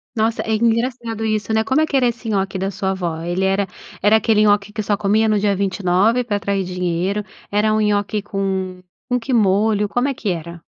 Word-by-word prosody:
Nossa, 225 0 +1
é 220 - 0
engraçado 230 0 0
isso, 215 -1 -1
né? 220 0 +2
Como 265 +6 +2
é - - +3
que 290 -3 0
era 255 -2 +3
esse 235 -1 -4
nhoque 195 -2 -1
da 195 +1 -2
sua 190 0 -2
avó? 170 -4 -3
Ele 175 +3 -2
era 195 +1 +1 0.3
era 210 +2 +5
aquele 220 0 +3
nhoque 205 -1 +2
que 215 - -3
só 205 0 0
comia 210 +2 +2
no 215 -1 +2
dia 205 0 +2
29 195 +4 +2
pra 215 -4 -1
atrair 200 -1 -1
dinheiro? 180 +2 -1 0.3
Era 210 +1 +2
um 215 - +2
nhoque 210 0 0
com 190 -2 -3 0.3
com 250 0 +1
que 255 +3 -3
molho? 210 -1 +2
Como 245 +5 0
é 280 - 0
que 225 -5 -4
era? 170 -1 -5
205 Hz, 220 wpm, -20 LUFS, 190-220 Hz, 0.3 s, era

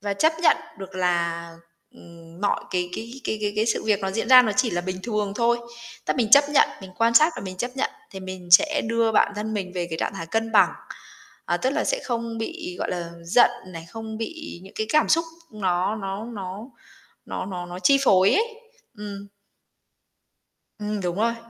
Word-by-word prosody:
và 200 0 -2
chấp 315 +10 +3
nhận - - +6 0.2
được 190 -1 -9
là, 170 -2 0 0.5
ừm, 170 +1 -15
mọi 205 - 0
cái 180 -1 -1
cái 230 +1 -6
cái 220 - -2
cái 205 - 0
cái 220 - +1
sự 225 - 0
việc 215 -2 +2
nó 195 0 -2
diễn 225 +4 -2
ra 255 -1 +10
nó 220 - 0
chỉ 255 -2 +3
là 175 - -1
bình 185 +1 -4
thường 210 -2 -2
thôi, 235 0 +2 0.5
tấp - - -1
mình 230 -4 0
chấp 285 +1 +8
nhận, 290 -1 +4
mình 190 -1 -10
quan 230 +1 +3
sát 310 +7 +6
và - - -6
mình 185 -1 -7
chấp 245 +6 -3
nhận 270 - 0 0.2
thì 190 - -8
mình 185 -1 -8
sẽ 305 - +6
đưa 230 -1 +2
bản 205 - +3
thân 215 +1 -3
mình 185 -3 -3
về 175 -1 -2
cái 160 - -4
trạng - - -2
thái 165 - -6
cân 225 +4 -2
bằng, 200 -5 +6 0.7
à, - - 0
tức 260 - 0
là 300 +2 0
sẽ - - 0
không 230 -2 -3
bị, 340 +9 -5
gọi - - -2
là, 175 -2 -4
giận 225 +10 +5 0.2
này, 165 -3 -9
không 220 +1 -7
bị 315 - -6
những 190 - -14
cái 220 - -1
cảm 305 0 +3
xúc 330 +1 +3 0.3
nó 190 0 0
nó 195 +1 -5
nó 200 -4 -6 0.7
nó - - -4
nó 180 -2 -5
nó 175 0 -7
chi 275 +9 +4
phối 190 -3 +5
ấy. 435 - +3 0.5
Ừm. 200 -1 -7 1.5
Ừm, 210 -1 -3
đúng 175 -1 -2
rồi. 230 +3 +1
210 Hz, 210 wpm, -24 LUFS, 185-235 Hz, 1.5 s, ra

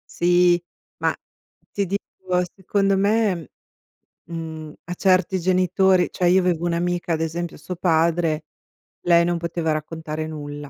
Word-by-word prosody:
Sì, 175 0 +4 0.3
ma, - - +1 0.6
ti 200 -1 -1
dico, 185 -1 -2
secondo 195 +1 +1
me, 200 - +1 0.8
mhmm, 160 -2 -6
a 175 - -5
certi 185 0 +2
genitori 185 +1 +3
cioè, 180 - -1
io 185 +2 +5
avevo 175 -2 0
un'amica, 175 0 -1
ad 160 - -1
esempio, 165 +1 -3
a - - -14
suo 180 - -6
padre, 165 -2 +1 0.6
lei 170 -1 +5
non 175 0 0
poteva 170 -1 -2
raccontare 155 0 -4
nulla. 145 -2 -7
175 Hz, 135 wpm, -23 LUFS, 160-185 Hz, 0.8 s, io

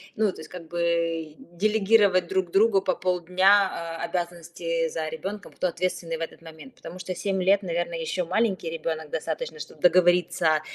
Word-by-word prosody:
Ну, 215 -2 +2
то - - -14
есть, 160 - -9
как 170 -3 -10
бы, 170 -2 -1 0.2
делегировать 200 -1 +3
друг 185 0 0
другу 200 0 +4
по - - 0
полдня, 180 -1 +2
э, - - -1
обязанности 170 -1 -2
за 160 0 -3
ребенком, 195 +6 -6
кто - - -1
ответственный 175 -1 -2
в - - -9
этот 165 - -6
момент, 165 +11 -13
потому 180 - -10
что 185 0 -5
7 190 +1 -1
лет, 195 +2 +4
наверное, 170 -2 -2
еще 170 +3 -2
маленький 185 -1 0
ребенок, 160 -1 -4
достаточно, - - -4
чтобы - - -10
договориться 175 -3 +4
175 Hz, 165 wpm, -26 LUFS, 165-195 Hz, 0.2 s, другу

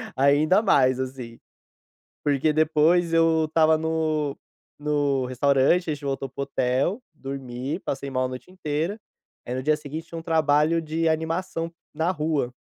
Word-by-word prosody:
ainda 145 +8 +4
mais, 130 - +3
assim. 130 -3 -6 0.8
Porque 145 +1 +2
depois 160 +2 +3
eu 165 -1 +4
estava 160 0 +3
no 155 -2 -1 0.4
no 145 -3 0
restaurante, 140 +6 +2
a - - +1
gente 145 0 -9
voltou 135 0 -2
para 135 +1 -7
o - - +1
hotel, 140 - 0
dormi, 135 +3 -5
passei 140 -4 -4
mal 130 -1 0
a - - 0
noite 130 +8 -9
inteira. 170 +4 -3 0.5
Aí 125 - -4
no 130 - -3
dia 155 +1 +2
seguinte, 155 +2 -7
tinha 165 - -7
um - - -8
trabalho 160 0 +2
de 160 +1 -1
animação 165 +1 -1 0.2
na 160 +4 0
rua, 150 -6 -1
150 Hz, 155 wpm, -25 LUFS, 135-160 Hz, 0.8 s, ainda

